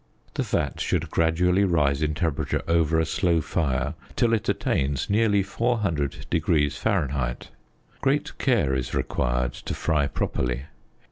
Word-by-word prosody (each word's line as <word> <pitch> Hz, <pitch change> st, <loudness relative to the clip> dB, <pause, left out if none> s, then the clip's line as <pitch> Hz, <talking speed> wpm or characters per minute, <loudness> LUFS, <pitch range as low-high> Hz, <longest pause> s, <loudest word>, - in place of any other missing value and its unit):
The -, -, -1 dB
fat -, -, -1 dB
should -, -, -1 dB
gradually 90 Hz, +4 st, +2 dB
rise 75 Hz, -6 st, +2 dB
in 75 Hz, -1 st, 0 dB
temperature 80 Hz, -3 st, -1 dB
over 80 Hz, -1 st, +3 dB
a 80 Hz, -, +2 dB
slow 85 Hz, +1 st, +1 dB
fire 70 Hz, -3 st, -1 dB, 0.2 s
till 115 Hz, -1 st, +2 dB
it 110 Hz, -, 0 dB
attains 70 Hz, +5 st, 0 dB
nearly 105 Hz, -2 st, +3 dB
400┬░ 85 Hz, -, 0 dB
Fahr. 70 Hz, -, -1 dB, 0.6 s
Great -, -, 0 dB
care 65 Hz, -2 st, +2 dB
is 65 Hz, -2 st, -2 dB
required -, -, 0 dB
to -, -, -5 dB
fry 75 Hz, -3 st, +1 dB
properly. 65 Hz, -2 st, -2 dB
80 Hz, 130 wpm, -25 LUFS, 70-90 Hz, 0.6 s, over